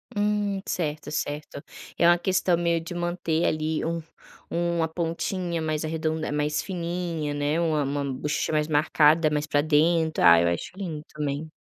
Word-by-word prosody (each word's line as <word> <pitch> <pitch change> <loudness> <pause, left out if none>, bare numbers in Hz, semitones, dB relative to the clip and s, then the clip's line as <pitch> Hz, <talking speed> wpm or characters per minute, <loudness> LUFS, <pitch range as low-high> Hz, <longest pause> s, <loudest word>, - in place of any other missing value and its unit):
Hum, 205 -1 0
certo, 150 -3 -3
certo. 145 -1 -4 0.4
É 170 - +4
uma 175 0 +6
questão 180 -1 +1
meio 170 -1 +1
de 165 +2 -7
manter 175 -1 -1
ali, 155 0 0
um 165 0 -2 0.5
uma 170 -1 0
pontinha 170 +1 -2
mais 155 0 -1
arredonda 160 -1 -2
mais 150 0 0
fininha, 170 -4 -3
né, 145 +3 0
uma 155 -3 +1
uma 140 +1 -2
buchecha 150 +4 -2
mais 150 0 +1
marcada, 155 +1 +4
mais 150 0 -1
para 145 -1 +2
dentro. 160 +1 +2
Ah, 85 0 +8
eu 85 - +2
acho 85 - -3
lindo 160 -6 -5
também. 150 +1 -3
160 Hz, 160 wpm, -26 LUFS, 150-170 Hz, 0.5 s, Ah